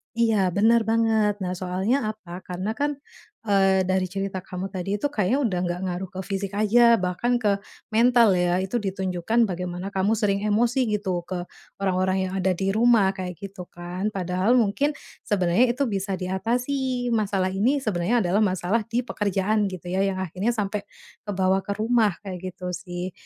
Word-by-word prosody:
Iya, 230 Hz, -1 st, +2 dB, 0.2 s
bener 225 Hz, +3 st, +5 dB
banget. 225 Hz, -2 st, +3 dB
Nah, 180 Hz, -, -2 dB
soalnya 185 Hz, +6 st, 0 dB
apa? 190 Hz, -5 st, -8 dB
Karena 185 Hz, +4 st, -3 dB
kan, 290 Hz, 0 st, +1 dB, 0.6 s
eee, 195 Hz, -1 st, +4 dB
dari 185 Hz, 0 st, +1 dB
cerita 195 Hz, 0 st, -3 dB
kamu 185 Hz, +1 st, -6 dB
tadi, 195 Hz, +1 st, -2 dB
itu 210 Hz, +8 st, 0 dB
kayaknya 215 Hz, +1 st, +1 dB
udah 185 Hz, -6 st, 0 dB
nggak 175 Hz, 0 st, -2 dB
ngaruh 180 Hz, +1 st, -4 dB
ke 185 Hz, -, -6 dB
fisik 195 Hz, +1 st, -4 dB
aja, 235 Hz, +3 st, +5 dB
bahkan 185 Hz, +5 st, 0 dB
ke 200 Hz, -3 st, +2 dB, 0.3 s
mental, 235 Hz, 0 st, +5 dB
ya, 175 Hz, 0 st, +2 dB
itu 215 Hz, +6 st, -1 dB
ditunjukkan 190 Hz, +2 st, 0 dB
bagaimana 180 Hz, +1 st, -4 dB
kamu 195 Hz, +2 st, +1 dB
sering 205 Hz, -2 st, +1 dB
emosi 230 Hz, +5 st, +2 dB, 0.2 s
gitu 185 Hz, -4 st, -2 dB
ke 180 Hz, -2 st, -3 dB, 0.4 s
orang-orang 185 Hz, 0 st, +1 dB
yang 185 Hz, -, -7 dB
ada 190 Hz, 0 st, +2 dB
di 195 Hz, +2 st, 0 dB
rumah, 220 Hz, -2 st, +4 dB
kayak 185 Hz, -2 st, -6 dB
gitu 195 Hz, -2 st, -8 dB
kan, 175 Hz, +3 st, -5 dB
padahal 185 Hz, +4 st, +1 dB
mungkin 245 Hz, +6 st, +2 dB, 0.3 s
sebenernya 185 Hz, +2 st, +3 dB
itu 250 Hz, +4 st, 0 dB
bisa 195 Hz, -1 st, -2 dB
diatasi, 245 Hz, +7 st, -1 dB
masalah 200 Hz, -4 st, +1 dB
ini 220 Hz, +9 st, +2 dB
sebenernya 215 Hz, +3 st, +1 dB
adalah 185 Hz, +4 st, +2 dB
masalah 190 Hz, +3 st, +1 dB
di 235 Hz, +2 st, 0 dB
pekerjaan, 205 Hz, -1 st, 0 dB
gitu 185 Hz, -2 st, -7 dB
ya, 190 Hz, +1 st, +1 dB
yang 195 Hz, -1 st, -1 dB
akhirnya 185 Hz, +5 st, -2 dB
sampai 210 Hz, -1 st, -2 dB, 0.5 s
kebawa 190 Hz, -1 st, +2 dB
ke 200 Hz, -, -3 dB
rumah, 220 Hz, -3 st, +2 dB
kayak 185 Hz, -3 st, -6 dB
gitu 180 Hz, 0 st, -6 dB
sih. 180 Hz, 0 st, -5 dB
195 Hz, 170 wpm, -24 LUFS, 185-220 Hz, 0.6 s, bener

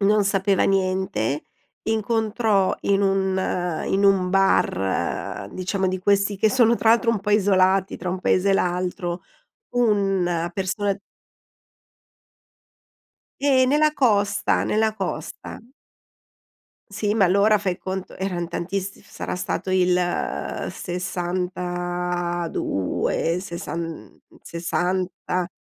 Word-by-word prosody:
non 205 Hz, +1 st, +3 dB
sapeva 195 Hz, -1 st, +2 dB
niente, 185 Hz, -, 0 dB, 0.4 s
incontrò 220 Hz, -2 st, +1 dB
in 200 Hz, 0 st, +2 dB
un 190 Hz, -3 st, 0 dB
in 195 Hz, +1 st, +1 dB
un 195 Hz, -2 st, +4 dB
bar, 100 Hz, -, 0 dB
diciamo 190 Hz, +1 st, -1 dB
di 185 Hz, 0 st, -2 dB
questi 200 Hz, +1 st, +2 dB
che 215 Hz, +3 st, +3 dB
sono 235 Hz, -2 st, +4 dB
tra 225 Hz, -, +3 dB
l'altro 230 Hz, 0 st, +4 dB
un 220 Hz, -, -1 dB
po' 210 Hz, +1 st, -3 dB
isolati 190 Hz, -2 st, +3 dB
tra 180 Hz, -, -5 dB
un 185 Hz, -, -2 dB
paese 185 Hz, +1 st, +2 dB
e -, -, +5 dB
l'altro, 180 Hz, -1 st, -1 dB, 0.5 s
un 195 Hz, -7 st, +1 dB
persona 195 Hz, +1 st, -1 dB, 2.4 s
Eh 265 Hz, -2 st, +4 dB
nella 300 Hz, +3 st, +3 dB
costa, 205 Hz, -7 st, +2 dB
nella 220 Hz, 0 st, +1 dB
costa. 195 Hz, -4 st, -5 dB, 1.3 s
Sì, 205 Hz, +1 st, -1 dB
ma 215 Hz, -3 st, +4 dB
allora 200 Hz, +4 st, +4 dB
fai 190 Hz, -3 st, -2 dB
conto, 190 Hz, 0 st, -5 dB
eran 180 Hz, -3 st, -2 dB
tantiss 190 Hz, +3 st, -4 dB
sarà -, -, -6 dB
stato 185 Hz, +1 st, -3 dB
il 180 Hz, -1 st, +3 dB, 0.7 s
62, 175 Hz, -, -2 dB
sessan 170 Hz, -2 st, -6 dB, 0.2 s
60, 180 Hz, +1 st, -2 dB
190 Hz, 105 wpm, -23 LUFS, 180-205 Hz, 2.4 s, e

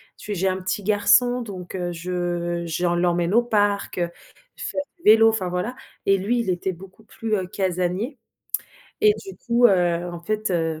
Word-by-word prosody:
Tu 210 Hz, -, -6 dB
j'ai 190 Hz, +2 st, 0 dB
un 190 Hz, 0 st, -1 dB
petit 185 Hz, +2 st, -2 dB
garçon, 215 Hz, +5 st, +4 dB
donc, 190 Hz, -6 st, -7 dB
heu, 175 Hz, -1 st, -2 dB
je 175 Hz, 0 st, -2 dB
j'en 175 Hz, +2 st, 0 dB
l'emmène 175 Hz, 0 st, +1 dB
au 235 Hz, -, +6 dB
parc, 205 Hz, -3 st, 0 dB
heu, 175 Hz, -1 st, 0 dB, 0.5 s
faire 285 Hz, -, -3 dB, 0.2 s
du 340 Hz, -, -26 dB
vélo, 225 Hz, 0 st, +7 dB
enfin 195 Hz, -5 st, -1 dB
voilà 180 Hz, +8 st, -2 dB, 0.3 s
et 195 Hz, 0 st, +4 dB
lui, 225 Hz, +6 st, 0 dB
il 205 Hz, -, -3 dB
était 180 Hz, +1 st, -1 dB
beaucoup 190 Hz, +4 st, -14 dB
plus, 220 Hz, 0 st, -3 dB
heu, 185 Hz, -2 st, -2 dB
casanier 185 Hz, -, -2 dB, 0.8 s
et 425 Hz, 0 st, +7 dB
du 385 Hz, -, -8 dB
coup, 240 Hz, 0 st, +4 dB
heu, 175 Hz, -3 st, +2 dB
en 170 Hz, -1 st, -7 dB
fait, 215 Hz, +2 st, -2 dB
heu, 165 Hz, -3 st, 0 dB
190 Hz, 185 wpm, -23 LUFS, 175-215 Hz, 0.8 s, vélo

